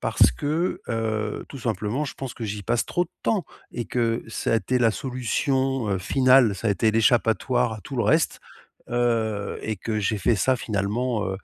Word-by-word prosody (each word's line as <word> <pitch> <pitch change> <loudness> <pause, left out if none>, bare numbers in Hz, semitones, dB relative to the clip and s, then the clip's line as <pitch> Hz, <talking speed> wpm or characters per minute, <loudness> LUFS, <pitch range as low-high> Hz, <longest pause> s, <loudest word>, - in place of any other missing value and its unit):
parce - - +4
que, 160 +5 -1
heu, 110 -2 -2
tout 140 - -9
simplement, 115 +4 -2
je 140 - -5
pense 135 -2 -6
que 115 - -6
j'y 105 -1 -4
passe 120 +4 0
trop 175 - 0
de - - -20
temps 205 -5 +1 0.3
et 120 - -3
que 115 -1 0
ça 110 - -2
a 115 - +4
été 125 +3 0
la 115 -2 +4
solution, 130 +1 -1
heu, 95 -2 0
finale, 130 +2 +4
ça 110 +4 -2
a - - +3
été 105 +3 +2
l'échappatoire 115 +1 +2
à 110 - -7
tout 135 +3 -7
le 120 - +2
reste, 155 +10 +2 0.5
heu, 115 -4 0
et 110 -1 -2
que 110 +3 -3
j'ai 105 +1 0
fait 110 +3 +2
ça 130 +6 +2
finalement, 110 +2 -1
heu, 95 0 -3
115 Hz, 200 wpm, -24 LUFS, 105-130 Hz, 0.5 s, parce